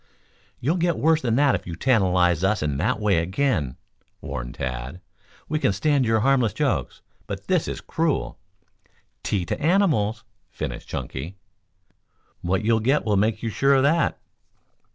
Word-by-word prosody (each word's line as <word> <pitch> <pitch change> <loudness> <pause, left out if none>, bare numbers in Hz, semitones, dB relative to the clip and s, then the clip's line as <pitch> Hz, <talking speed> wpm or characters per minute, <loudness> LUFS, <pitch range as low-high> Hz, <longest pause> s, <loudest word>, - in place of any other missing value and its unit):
"You'll 155 +9 0
get 170 -1 +1
worse 160 0 +3
than 115 -3 0
that 140 0 +4
if - - -3
you 85 - -5
tantalize 90 - +2
us 100 -2 +1
in 75 -3 -1
that 85 - 0
way 105 -5 +2
again," 90 - -1 0.4
warned - - -6
Tad. 65 +5 -5 0.5
"We 155 +1 -1
can 100 - +2
stand 140 +6 +1
for - - -2
your 110 0 +3
harmless 125 -4 +2
jokes, - - -2 0.2
but - - -6
this - - +1
is - - -5
cruel 160 -3 -1 0.3
" - - -40
" - - -40
ty 95 -3 0
to 85 - -4
animals," 150 - +2 0.3
finished - - -6
Chunky. 80 +9 -5 1.1
"What 95 +4 -1
you'll 115 0 +3
get 130 +6 +1
will 105 -2 +2
make 105 +4 +1
you 115 - -1
sure 135 +5 +3
of 135 - +3
that." 165 +4 +2
110 Hz, 170 wpm, -24 LUFS, 90-140 Hz, 1.1 s, that